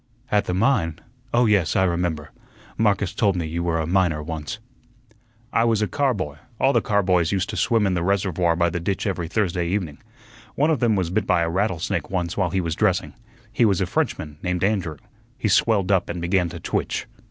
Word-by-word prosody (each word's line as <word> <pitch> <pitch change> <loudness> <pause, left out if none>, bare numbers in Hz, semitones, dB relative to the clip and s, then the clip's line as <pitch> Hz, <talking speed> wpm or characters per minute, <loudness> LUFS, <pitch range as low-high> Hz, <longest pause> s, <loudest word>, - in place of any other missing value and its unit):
"At 105 -1 +2
the 90 - -2
mine? 95 - +1 0.3
Oh, 120 +1 +3
yes, 100 -7 +2
I 95 - +4
remember, 85 -4 -1 0.4
Marcus 100 -4 +1
told 100 -3 +2
me 85 -2 -2
you 80 +2 -3
were 85 -1 0
a 80 - -1
miner 85 -3 +1
once." 80 +3 -5 1.0
"I 115 - +3
was 115 -2 +2
a - - 0
car 140 -4 +1
boy; 75 -8 -4 0.2
all 135 +1 +3
the - - +3
car 100 -1 +1
boys 90 -3 +2
used 95 -2 -1
to - - -5
swim 115 -4 +2
in 95 - +1
the 90 - 0
reservoir 90 -2 +1
by 85 0 +1
the 85 - -2
ditch 95 +3 -2
every 90 -5 -2
Thursday 90 -2 0
evening. 85 -5 -2 0.6
One 150 +3 +2
of 150 - +1
them 115 -2 +2
was 90 -3 -1
bit 95 +1 0
by 85 - +3
a 85 - 0
rattlesnake 95 -2 -1
once 90 -3 -2
while 95 -3 +1
he 95 +2 0
was 85 -2 -2
dressing. 95 +1 0 0.4
He 120 - +2
was 100 -5 +3
a - - +1
Frenchman, 75 -1 -2
named 90 -1 -1
Andrew. 95 -7 0 0.4
He - - -1
swelled 100 -4 +3
up 95 -3 +2
and 85 - -3
began 90 +1 +1
to 85 0 -8
twitch." - - -2
90 Hz, 215 wpm, -23 LUFS, 85-100 Hz, 1.0 s, I